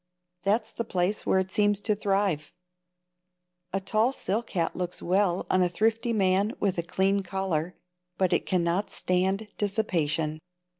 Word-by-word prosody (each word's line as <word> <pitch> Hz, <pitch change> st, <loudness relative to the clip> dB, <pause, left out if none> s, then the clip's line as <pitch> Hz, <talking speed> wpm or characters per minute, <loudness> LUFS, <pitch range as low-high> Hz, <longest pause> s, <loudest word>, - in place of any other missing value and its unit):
That's 215 Hz, +4 st, +1 dB
the 230 Hz, -, -3 dB
place 190 Hz, -1 st, -1 dB
where -, -, +4 dB
it 190 Hz, 0 st, 0 dB
seems 205 Hz, -1 st, +2 dB
to 215 Hz, -, +1 dB
thrive. 195 Hz, -7 st, 0 dB, 1.2 s
A 195 Hz, -, 0 dB
tall 215 Hz, +5 st, +2 dB
silk 225 Hz, -3 st, -2 dB
hat 170 Hz, -4 st, -1 dB
looks 180 Hz, -1 st, -4 dB
well 185 Hz, 0 st, +1 dB
on 185 Hz, -, +2 dB
a 180 Hz, -, +3 dB
thrifty 225 Hz, +5 st, +1 dB
man 200 Hz, 0 st, +2 dB
with 190 Hz, -3 st, 0 dB
a -, -, +2 dB
clean 190 Hz, +3 st, +1 dB
collar, 180 Hz, -3 st, -2 dB, 0.4 s
but 185 Hz, -2 st, +2 dB
it -, -, 0 dB
cannot 180 Hz, +2 st, +1 dB
stand 190 Hz, +4 st, 0 dB
dissipation. 165 Hz, -7 st, 0 dB
190 Hz, 150 wpm, -27 LUFS, 180-205 Hz, 1.2 s, where